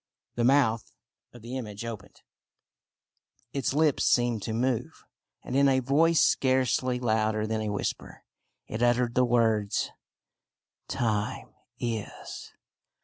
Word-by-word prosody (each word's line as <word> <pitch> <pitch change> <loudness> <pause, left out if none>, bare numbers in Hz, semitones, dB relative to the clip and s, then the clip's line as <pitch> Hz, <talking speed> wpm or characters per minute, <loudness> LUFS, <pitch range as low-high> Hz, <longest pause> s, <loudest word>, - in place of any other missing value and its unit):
The 120 - -1
mouth 120 -4 +3 0.4
of 120 -2 -14
the 120 +2 -6
image 105 -3 -6
opened, 110 -4 -8 1.3
its 135 -3 -1
lips 150 -2 +3
seemed 120 -3 +2
to 110 - -4
move, 120 +1 -2 0.4
and 125 - -5
in 140 0 +5
a 130 -1 +3
voice 150 +6 +3
scarcely 130 -1 +1
louder 110 -2 +1
than 110 0 -2
a 110 - -2
whisper, 105 -1 -4 0.4
it 110 - -5
uttered 120 0 +2
the 125 +1 +3
words 110 -4 +1 0.3
— - - -64
" - - -60
Time 110 -3 -2 0.2
is 115 -4 -5
120 Hz, 130 wpm, -28 LUFS, 110-130 Hz, 1.3 s, in